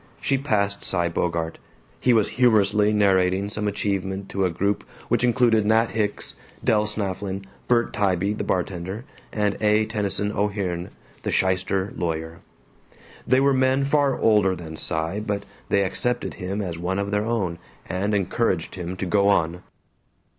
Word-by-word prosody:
She 135 Hz, -1 st, +1 dB
passed 100 Hz, -7 st, 0 dB
Cy 85 Hz, -2 st, +1 dB
Bogart. 85 Hz, -1 st, -2 dB, 0.4 s
He 125 Hz, -, +3 dB
was 110 Hz, -3 st, +3 dB
humorously 105 Hz, -4 st, +3 dB
narrating 95 Hz, -1 st, +2 dB
some 105 Hz, 0 st, -2 dB
achievement 100 Hz, -1 st, -2 dB
to 95 Hz, -1 st, 0 dB
a -, -, +2 dB
group 100 Hz, +4 st, -1 dB, 0.3 s
which -, -, +2 dB
included 120 Hz, -3 st, +4 dB
Nat 115 Hz, +1 st, +3 dB
Hicks, 105 Hz, -2 st, -2 dB, 0.3 s
Del 105 Hz, -1 st, +3 dB
Snafflin, 100 Hz, -2 st, -3 dB, 0.2 s
Bert 120 Hz, -1 st, +2 dB
Tybee 100 Hz, 0 st, +1 dB
the 105 Hz, -, -3 dB
bartender, 95 Hz, +4 st, -2 dB, 0.3 s
and 105 Hz, -2 st, 0 dB
A. 105 Hz, 0 st, +3 dB
Tennyson 105 Hz, -1 st, -1 dB
O'Hearn 100 Hz, -4 st, -2 dB, 0.3 s
the -, -, -3 dB
shyster 95 Hz, +1 st, 0 dB
lawyer. 80 Hz, -1 st, -3 dB, 0.9 s
They 130 Hz, +2 st, +4 dB
were 140 Hz, 0 st, +4 dB
men 130 Hz, +1 st, +2 dB
far 140 Hz, -1 st, +2 dB
older 105 Hz, -4 st, +3 dB
than 80 Hz, -3 st, -8 dB
Cy 80 Hz, +5 st, -2 dB
but 100 Hz, -1 st, -2 dB, 0.3 s
they 100 Hz, -, +3 dB
accepted 120 Hz, +6 st, -1 dB
him 95 Hz, +3 st, -3 dB
as 85 Hz, -3 st, -5 dB
one 90 Hz, +2 st, -1 dB
of 100 Hz, 0 st, -2 dB
their 105 Hz, +1 st, +1 dB
own, 95 Hz, -8 st, -1 dB, 0.3 s
and 100 Hz, +3 st, -1 dB
encouraged 95 Hz, -3 st, 0 dB
him 90 Hz, 0 st, -5 dB
to 95 Hz, -, -3 dB
go 100 Hz, +2 st, +3 dB
on. 85 Hz, -3 st, +2 dB
100 Hz, 155 wpm, -24 LUFS, 90-110 Hz, 0.9 s, included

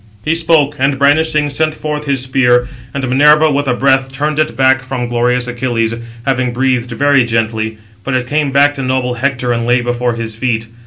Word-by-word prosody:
He 155 Hz, -, +1 dB
spoke, 160 Hz, -3 st, +2 dB
and, 135 Hz, +1 st, +1 dB
brandishing, 150 Hz, +2 st, +2 dB
sent 155 Hz, +2 st, 0 dB
forth 150 Hz, -1 st, -4 dB
his 140 Hz, -3 st, 0 dB
spear; 125 Hz, -2 st, +2 dB, 0.2 s
and 135 Hz, 0 st, -3 dB
Minerva 150 Hz, +4 st, +4 dB
with 145 Hz, 0 st, -1 dB
a 125 Hz, -, +1 dB
breath 135 Hz, 0 st, +1 dB
turned 150 Hz, +3 st, -2 dB
it 155 Hz, -, -1 dB
back 130 Hz, 0 st, +3 dB
from 125 Hz, -1 st, -4 dB
glorious 125 Hz, +1 st, 0 dB
Achilles, 120 Hz, -2 st, -2 dB, 0.3 s
having 130 Hz, -2 st, 0 dB
breathed 125 Hz, -1 st, 0 dB
very 140 Hz, +2 st, +2 dB
gently; 110 Hz, -1 st, -2 dB, 0.3 s
but 135 Hz, -, -2 dB
it 125 Hz, -1 st, -1 dB
came 150 Hz, +2 st, 0 dB
back 140 Hz, +1 st, +3 dB
to 140 Hz, -, -5 dB
noble 130 Hz, -1 st, -1 dB
Hector, 125 Hz, 0 st, -1 dB
and 115 Hz, 0 st, -2 dB
lay 120 Hz, 0 st, +3 dB
before 120 Hz, 0 st, -1 dB
his 115 Hz, -1 st, -6 dB
feet. 115 Hz, -1 st, -1 dB
130 Hz, 195 wpm, -14 LUFS, 120-145 Hz, 0.3 s, Minerva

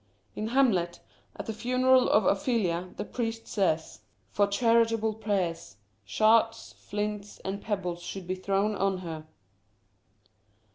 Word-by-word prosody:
In 215 Hz, -, -3 dB
Hamlet, 220 Hz, -9 st, +2 dB, 0.4 s
at -, -, -6 dB
the 220 Hz, -, -3 dB
funeral 255 Hz, +3 st, +3 dB
of 210 Hz, -2 st, +4 dB
Ophelia, 190 Hz, -5 st, +1 dB
the -, -, -3 dB
priest 225 Hz, -1 st, -4 dB
says 160 Hz, -, 0 dB, 0.2 s
— 110 Hz, +1 st, -40 dB
For 205 Hz, 0 st, +3 dB
charitable 225 Hz, 0 st, +2 dB
prayers, 185 Hz, -, -2 dB, 0.3 s
Shards, 220 Hz, -, +2 dB
flints, 210 Hz, 0 st, -4 dB
and 195 Hz, +1 st, -3 dB
pebbles 180 Hz, -5 st, -3 dB
should 180 Hz, +1 st, -6 dB
be 185 Hz, -, -2 dB
thrown 195 Hz, +3 st, 0 dB
on 195 Hz, -1 st, 0 dB
her. 160 Hz, -2 st, -6 dB
205 Hz, 130 wpm, -28 LUFS, 180-225 Hz, 0.4 s, of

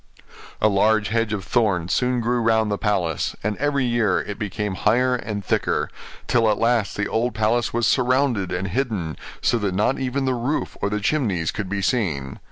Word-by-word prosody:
A 110 Hz, -, +4 dB
large 105 Hz, 0 st, +2 dB
hedge 115 Hz, 0 st, 0 dB
of 100 Hz, -3 st, -3 dB
thorns 100 Hz, -8 st, +1 dB
soon 125 Hz, -1 st, +1 dB
grew 120 Hz, +1 st, 0 dB
round 110 Hz, -1 st, +2 dB
the 100 Hz, -, -1 dB
palace, 90 Hz, -8 st, 0 dB
and 105 Hz, +1 st, -1 dB
every 140 Hz, -2 st, +1 dB
year 120 Hz, -5 st, +2 dB
it 105 Hz, -, -6 dB
became 105 Hz, -1 st, -3 dB
higher 125 Hz, +7 st, +2 dB
and 105 Hz, -5 st, -4 dB
thicker; -, -, 0 dB, 0.3 s
till 115 Hz, -2 st, +3 dB
at 105 Hz, -, +2 dB
last 115 Hz, -4 st, +1 dB
the 100 Hz, -, 0 dB
old 120 Hz, +2 st, -1 dB
palace 110 Hz, +2 st, +1 dB
was 120 Hz, 0 st, 0 dB
surrounded 125 Hz, -6 st, +2 dB
and 90 Hz, +2 st, -2 dB
hidden, 100 Hz, -, -2 dB, 0.3 s
so 120 Hz, -, +2 dB
that 100 Hz, -3 st, -1 dB
not 105 Hz, +7 st, +1 dB
even 135 Hz, +1 st, -1 dB
the 130 Hz, -, +1 dB
roof 125 Hz, +5 st, -2 dB
or 100 Hz, -, +1 dB
the 105 Hz, +1 st, -1 dB
chimneys 100 Hz, -, 0 dB
could 100 Hz, -3 st, -4 dB
be 100 Hz, 0 st, -2 dB
seen. 80 Hz, -, -1 dB
110 Hz, 190 wpm, -22 LUFS, 100-125 Hz, 0.3 s, A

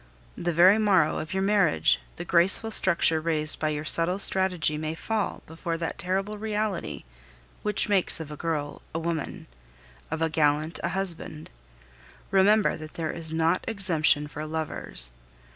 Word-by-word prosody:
The 175 Hz, -, -3 dB
very 185 Hz, +6 st, +5 dB
morrow 190 Hz, -7 st, +2 dB
of 155 Hz, -, -7 dB
your 190 Hz, 0 st, -1 dB
marriage 195 Hz, -5 st, +2 dB, 0.2 s
the 175 Hz, -, -7 dB
graceful 180 Hz, +6 st, +3 dB
structure 170 Hz, -5 st, +5 dB
raised 155 Hz, -1 st, +2 dB
by 155 Hz, -, -1 dB
your 150 Hz, 0 st, -4 dB
subtle 165 Hz, +4 st, +4 dB
strategy 185 Hz, -6 st, +3 dB
may 155 Hz, +1 st, -4 dB
fall 220 Hz, +5 st, -4 dB
before 165 Hz, +1 st, -5 dB
that 165 Hz, 0 st, -5 dB
terrible 195 Hz, +4 st, -3 dB
reality 210 Hz, -3 st, -4 dB, 0.6 s
which 210 Hz, -1 st, 0 dB
makes 195 Hz, -5 st, +1 dB
of 155 Hz, -2 st, -8 dB
a -, -, -7 dB
girl 150 Hz, -2 st, -4 dB
a -, -, 0 dB
woman, 165 Hz, -2 st, -5 dB, 0.6 s
of 160 Hz, +1 st, -3 dB
a -, -, +2 dB
gallant 155 Hz, +1 st, 0 dB
a -, -, -1 dB
husband. 175 Hz, -5 st, -4 dB, 0.8 s
Remember 205 Hz, +2 st, +3 dB
that 155 Hz, -1 st, -11 dB
there 160 Hz, -2 st, -3 dB
is 160 Hz, -2 st, -1 dB
not 165 Hz, +2 st, 0 dB
exemption 165 Hz, -9 st, +1 dB
for 150 Hz, +1 st, -8 dB
lovers. 155 Hz, -, -2 dB
165 Hz, 155 wpm, -25 LUFS, 155-190 Hz, 0.8 s, very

